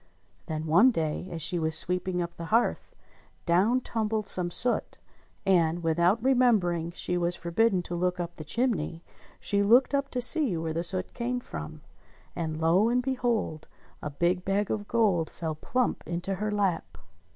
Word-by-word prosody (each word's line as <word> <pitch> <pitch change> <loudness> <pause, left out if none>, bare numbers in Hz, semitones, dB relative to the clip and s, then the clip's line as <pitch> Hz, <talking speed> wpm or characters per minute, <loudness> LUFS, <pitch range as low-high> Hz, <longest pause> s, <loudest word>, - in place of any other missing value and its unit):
Then 155 0 -4
one 175 +11 +5
day, 165 -5 -2
as 165 -3 -4
she 175 +2 +1
was 160 0 +2
sweeping 180 0 0
up 170 0 -7
the 170 - -7
hearth, 225 +7 0 0.5
down 200 +9 +2
tumbled 220 -2 -2
some 180 -1 -1
soot, 240 +7 0 0.5
and, 175 -3 +2
without 170 +7 +2
remembering 215 -11 +2
she 180 0 -2
was 175 0 +1
forbidden 185 +2 +1
to 175 - -7
look 180 +1 -1
up 175 0 -5
the 155 - -7
chimney, 170 -5 -2 0.4
she 200 0 0
looked 240 +7 +4
up 280 0 0
to 250 - -3
see 250 - +5
where 160 0 -3
the 165 - -1
soot 185 +2 +1
came 250 +1 -2
from. - - -8 0.5
And 160 -2 -4
lo! 175 +7 +3
and 250 +1 +1
behold, 240 - -2 0.3
a 150 - -4
big 175 +5 0
bag 195 +2 -1
of 205 -1 -3
gold 200 -9 +1
fell 160 -2 -4
plump 250 +11 -1
into 175 +3 -3
her 210 +3 -3
lap. 195 - -1
180 Hz, 170 wpm, -27 LUFS, 170-225 Hz, 0.5 s, one